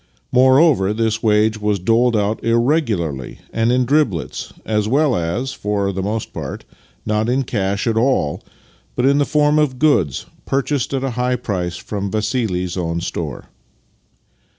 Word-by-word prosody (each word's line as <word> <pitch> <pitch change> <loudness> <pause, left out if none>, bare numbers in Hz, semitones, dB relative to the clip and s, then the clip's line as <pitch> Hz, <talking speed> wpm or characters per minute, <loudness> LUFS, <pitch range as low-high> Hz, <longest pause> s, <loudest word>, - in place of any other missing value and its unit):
Moreover, 130 - +4
this 110 0 0
wage 110 0 +2
was 105 -1 +1
doled 115 +5 +2
out 105 +1 -1
irregularly 115 - 0 0.2
and 115 +1 +2
in 125 0 +2
driblets, 120 - 0
as 105 -1 0
well 140 +2 +2
as, 90 +10 -2
for 100 -1 -1
the 95 - -3
most 105 +3 -3
part, - - -6 0.4
not 110 +2 0
in 130 +2 +1
cash 100 -4 -1
at 115 -2 +1
all, 115 - +1 0.5
but 125 - +1
in 140 +1 +4
the 145 - +3
form 150 0 +3
of 140 -4 +1
goods 125 - +2 0.2
purchased 135 -1 -1
at 135 - -2
a 135 - -1
high 125 +1 0
price 90 -7 -3
from 100 +2 -4
Vassili's 105 -4 -1
own 85 -1 -2
store. - - -5
110 Hz, 150 wpm, -19 LUFS, 100-130 Hz, 0.5 s, Moreover